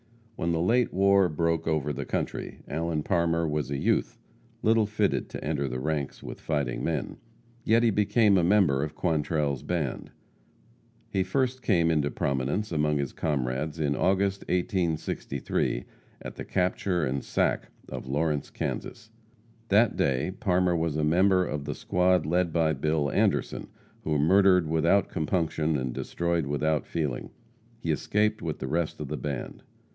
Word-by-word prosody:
When 85 - -1
the 80 - 0
late 115 +8 +2
war 100 -1 +4
broke 85 +1 0
over 75 -2 0
the 70 0 -4
country, - - -4
Allen 80 +1 -2
Parmer 85 -2 +1
was 75 -2 -2
a 70 - -2
youth, - - 0 0.5
little 110 -1 +3
fitted 105 -1 0
to - - -7
enter 75 -2 -1
the 65 0 -3
ranks 75 -1 -3
with - - -8
fighting 70 -6 -2
men. - - -2 0.5
Yet 115 +1 +3
he 115 - +4
became 105 +1 +3
a - - +2
member 85 -7 +3
of 75 - -5
Quantrell's 75 -4 0
band. 80 -7 -3 1.0
He 95 - +1
first 130 +7 0
came 85 -8 +2
into 75 -3 +1
prominence 70 +12 -1
among 75 -2 +1
his 70 -2 -2
comrades 75 +1 -2
in 70 -2 +1
August, 95 +1 +1
1863, 85 - -1 0.4
at - - -6
the - - -7
capture 90 -2 0
and 65 +1 -2
sack - - 0 0.2
of - - -7
Lawrence, 75 +1 -1
Kansas. 110 0 -5 0.6
That 110 +3 +4
day 70 +7 0
Parmer 90 -2 +2
was 80 -2 -1
a 75 - 0
member 90 +4 +3
of 75 -3 -4
the - - -3
squad 90 -1 +2
led 85 +2 +1
by 80 -1 +2
Bill 75 +1 0
Anderson, - - 0 0.4
who 75 -1 0
murdered 90 +3 +5
without 80 +5 +2
compunction 80 -1 0
and 65 -2 -3
destroyed 85 -3 -1
without 75 +2 0
feeling. 75 -7 -3 0.5
He - - -2
escaped 105 +1 0
with 80 -2 -3
the 65 - -5
rest 80 +3 -1
of 75 - -4
the 75 +2 -4
band. 70 -4 -5
80 Hz, 155 wpm, -27 LUFS, 75-95 Hz, 1.0 s, murdered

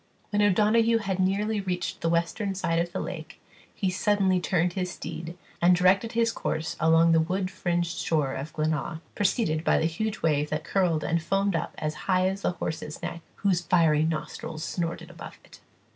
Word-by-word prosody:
When 205 0 +2
O'Donoghue 215 +3 +4
had 195 -4 -2
nearly 205 +3 +1
reached 180 -2 -3
the 165 - +1
western 180 +4 0
side 165 -3 0
of 170 +1 -1
the - - -3
lake, 165 -3 -6 0.4
he 190 -3 0
suddenly 195 -1 +2
turned 175 -1 +1
his 180 -1 -2
steed, 170 -1 -7 0.2
and 175 +1 +6
directed 185 +5 +3
his 230 0 +2
course 160 -6 -3
along 165 +1 +5
the 165 - +5
wood 185 +3 -1
fringed 175 -1 -1
shore 150 -5 0
of 140 +4 -5
Glenaa, 155 +1 -2
preceded 185 -6 +1
by - - +3
the - - +1
huge 215 +7 -2
wave 150 -2 +2
that 150 - -2
curled 175 -5 +1
and 165 0 0
foamed 195 +2 0
up 165 - -3
as 155 0 -2 0.2
high 185 0 +4
as 195 +1 -2
the 180 - 0
horse's 155 -2 -5
neck, 170 - -4
whose 190 -3 +1
fiery 165 -4 +3
nostrils 160 0 -4
snorted 170 -1 -3
above 165 - -10
it. - - -16
175 Hz, 185 wpm, -27 LUFS, 165-195 Hz, 0.4 s, and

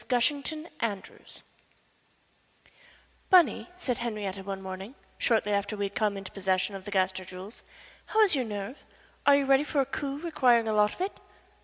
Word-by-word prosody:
GUSHINGTON 285 +5 0
ANDREWS 205 -4 -5 1.9
"Bunny," 360 -1 +5
said 275 -9 -2
Henrietta 210 -5 -3
one 195 0 -5
morning, 190 +5 -7 0.2
shortly 220 -3 +2
after 200 +1 -1
we 200 - 0
had 200 - -5
come 210 -2 0
into 195 -1 -7
possession 190 0 0
of 195 -1 -8
the 205 - -6
Gaster 190 -1 +1
jewels, 185 +4 -10 0.5
"how 440 - +3
is 415 -4 +5
your 260 -3 0
nerve? 210 +4 -6 0.4
Are 285 - +8
you 280 -1 +2
ready 270 +1 +5
for 300 -1 -1
a 270 - +3
coup 275 +1 -4
requiring 255 -8 +3
a 220 - +1
lot 210 0 +3
of - - -9
it?" 385 +2 -3
220 Hz, 170 wpm, -28 LUFS, 195-275 Hz, 1.9 s, Are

